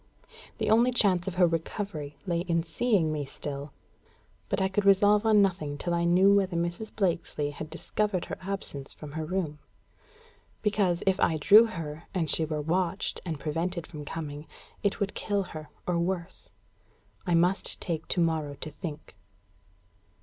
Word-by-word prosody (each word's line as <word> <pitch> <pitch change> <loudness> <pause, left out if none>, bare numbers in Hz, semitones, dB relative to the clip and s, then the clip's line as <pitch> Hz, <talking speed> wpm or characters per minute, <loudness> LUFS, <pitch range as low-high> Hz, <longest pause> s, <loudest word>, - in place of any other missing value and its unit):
The - - 0
only 235 +3 +5
chance 195 -7 +3
of 190 - -3
her 180 -1 +5
recovery 165 -2 -3
lay 170 -3 0
in 170 -2 0
seeing 170 0 +1
me 150 -1 -2
still; 140 +1 -6 0.8
but - - 0
I 190 - +2
could 195 +2 0
resolve 205 +2 +5
on 210 -2 +6
nothing 155 -7 -1
till 175 +3 -2
I 170 0 +1
knew 185 +3 +5
whether 190 -3 +2
Mrs. 175 +6 -2
Blakesley 170 -6 0
had 155 +1 -7
discovered 185 +3 -1
her - - -6
absence 185 -8 -5
from 150 -2 -10
her 160 +2 -3
room; 155 -3 -2 1.0
because, 200 -5 +1
if 190 0 +2
I 160 - +3
drew 210 +9 +7
her, 165 -5 -6
and 165 -5 +1
she 160 - +1
were 155 -1 -2
watched 175 +3 -1
and 160 -3 -3
prevented 165 +3 -2
from 150 -3 -8
coming, 150 -1 -6 0.3
it 205 +1 0
would 200 -2 -1
kill 205 -2 -1
her, 155 -4 -9 0.2
or 175 -1 0
worse. 180 +1 -3 0.8
I 175 - +3
must 180 +3 +2
take 165 -3 -3
to - - 0
morrow 160 -3 0
to 155 - -7
think. 155 - -8
170 Hz, 165 wpm, -28 LUFS, 155-195 Hz, 1.0 s, drew